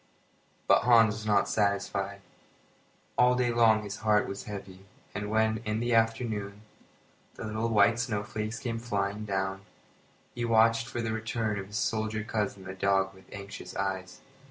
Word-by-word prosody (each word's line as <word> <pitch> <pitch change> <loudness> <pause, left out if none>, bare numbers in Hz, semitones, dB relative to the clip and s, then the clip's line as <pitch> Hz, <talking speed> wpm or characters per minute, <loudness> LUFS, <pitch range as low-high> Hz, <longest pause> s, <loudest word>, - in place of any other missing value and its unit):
But - - +6
Hans 115 -3 +6
was 105 0 -7
not 105 -1 +3
satisfied. 100 -1 -1 1.0
All 125 0 +5
day 125 -1 +1
long 115 -2 +4
his 105 +1 -6
heart 105 -1 +2
was 100 - -6
heavy, 95 -2 -8 0.3
and 105 0 -4
when, 110 0 +2
in 105 +1 -1
the 120 +1 0
afternoon, 110 -3 0 0.7
the - - -7
little 110 +2 -1
white 110 +1 +4
snowflakes 110 -1 -3
came 115 -2 -3
flying 105 -2 -2
down 95 -1 -2 0.7
he 120 - -4
watched 115 0 +4
for 120 - -3
the 110 - -1
return 110 -1 -2
of 95 - -6
his 105 +1 -5
soldier 110 -3 -1
cousin 105 -3 -3
and 95 +1 -6
the 95 - -18
dog 95 -1 +2
with 95 0 -18
anxious 100 0 -8
eyes. 95 -1 -3
110 Hz, 160 wpm, -29 LUFS, 100-115 Hz, 1.0 s, But